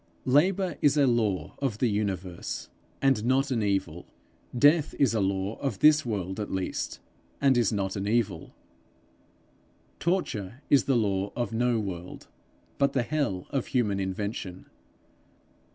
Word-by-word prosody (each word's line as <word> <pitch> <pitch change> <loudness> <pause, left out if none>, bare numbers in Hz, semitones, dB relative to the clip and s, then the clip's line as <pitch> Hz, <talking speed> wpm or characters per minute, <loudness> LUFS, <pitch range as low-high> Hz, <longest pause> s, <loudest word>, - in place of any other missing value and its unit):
Labour 175 +5 +2
is 145 0 +4
a 145 - +5
law 110 -7 0
of 135 -7 -1
the 125 - +2
universe, 95 -4 -3 0.3
and 135 -1 +4
is - - -6
not 135 +3 +2
an 120 -3 +1
evil. 95 -5 -1 0.5
Death 145 +3 +4
is 135 -5 +3
a 110 - +1
law 95 +1 -1
of 135 -8 -2
this 155 +5 +5
world 95 -3 -3
at 105 - -3
least, 95 -1 -3 0.4
and 135 -1 +4
is 120 -4 +2
not 95 -3 -2
an 100 0 -3
evil. 105 -6 -1 1.4
Torture 130 - -2
is 140 - +5
the 135 -3 +2
law 100 -2 0
of 120 -1 -2
no 120 0 +1
world 90 -4 -6 0.5
but 140 - +2
the 125 - +1
hell 120 -11 -1
of 135 -3 -1
human 105 -6 0
invention. 95 -1 -4
115 Hz, 150 wpm, -27 LUFS, 95-135 Hz, 1.4 s, a